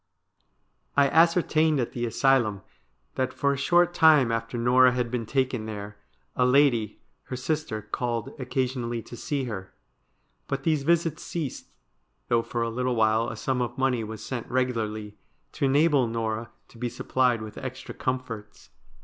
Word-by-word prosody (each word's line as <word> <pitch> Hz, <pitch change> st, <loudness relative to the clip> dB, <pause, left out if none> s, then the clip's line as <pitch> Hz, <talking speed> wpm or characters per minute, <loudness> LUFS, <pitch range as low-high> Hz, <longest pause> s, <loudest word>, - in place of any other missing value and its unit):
' -, -, -34 dB
I 140 Hz, -1 st, +5 dB
ascertained 160 Hz, -2 st, +3 dB
at 120 Hz, -, -1 dB
the 120 Hz, -1 st, -2 dB
asylum 115 Hz, -4 st, +2 dB, 0.5 s
that 130 Hz, 0 st, -1 dB
for 140 Hz, +1 st, +1 dB
a -, -, -2 dB
short 175 Hz, +5 st, +3 dB
time 155 Hz, -8 st, +5 dB
after 115 Hz, +1 st, -2 dB
Norah 125 Hz, +2 st, +5 dB
had 125 Hz, -2 st, -1 dB
been 120 Hz, -3 st, -2 dB
taken 130 Hz, -4 st, 0 dB
there, 105 Hz, -1 st, -6 dB, 0.4 s
a -, -, +2 dB
lady, 125 Hz, -5 st, +3 dB, 0.3 s
her 130 Hz, -, -5 dB
sister, 130 Hz, -4 st, -2 dB
called 115 Hz, 0 st, -3 dB
occa 130 Hz, 0 st, 0 dB
sionally 120 Hz, -2 st, -4 dB
to -, -, -9 dB
see 140 Hz, +3 st, -2 dB
her. 100 Hz, -6 st, -6 dB, 0.7 s
But 135 Hz, 0 st, -3 dB
these 155 Hz, -2 st, +2 dB
visits 165 Hz, +1 st, +1 dB
ceased, 155 Hz, -7 st, -5 dB, 0.6 s
though 120 Hz, -1 st, +3 dB
for 115 Hz, 0 st, -3 dB
a 115 Hz, -, -1 dB
little 125 Hz, +1 st, -1 dB
while 110 Hz, 0 st, +2 dB
a -, -, -6 dB
sum 125 Hz, +4 st, -1 dB
of 120 Hz, -, -3 dB
money 130 Hz, -3 st, +1 dB
was 110 Hz, 0 st, -7 dB
sent 120 Hz, -3 st, -5 dB
regularly 110 Hz, -5 st, -2 dB, 0.3 s
to -, -, -1 dB
enable 140 Hz, -1 st, +3 dB
Norah 115 Hz, 0 st, -3 dB, 0.2 s
to 115 Hz, -, -16 dB
be 120 Hz, 0 st, -2 dB
supplied 120 Hz, -1 st, 0 dB
with 110 Hz, -, -8 dB
extra 130 Hz, -1 st, -7 dB
comforts. 125 Hz, -5 st, -5 dB
125 Hz, 165 wpm, -26 LUFS, 115-135 Hz, 0.7 s, I